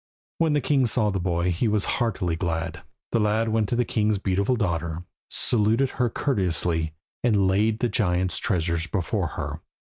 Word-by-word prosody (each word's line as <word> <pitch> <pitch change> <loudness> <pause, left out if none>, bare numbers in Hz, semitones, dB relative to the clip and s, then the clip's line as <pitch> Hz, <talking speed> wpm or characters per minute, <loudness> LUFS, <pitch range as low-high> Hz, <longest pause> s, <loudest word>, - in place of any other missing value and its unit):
When 165 -2 +3
the 145 - +2
king 135 -4 +2
saw 110 -2 +3
the 95 - -1
boy 85 0 0
he 90 +7 0
was 105 -2 +1 0.2
heartily 90 -8 0
glad. 80 -2 -3 0.3
The 115 - +2
lad 110 +1 +1
went 110 -2 +1
to - - 0
the 120 0 +1
king's 105 -1 +1
beautiful 100 +5 +1
daughter, 85 -5 -2 0.3
saluted 115 +4 +2
her 125 -2 0
courteously, 85 - 0 0.3
and 105 -5 +3
laid 105 +3 +2
the 120 - +3
giant's 90 -5 0
treasures 85 -6 -1
before 90 -2 -1
her. - - -4
105 Hz, 170 wpm, -25 LUFS, 90-115 Hz, 0.3 s, When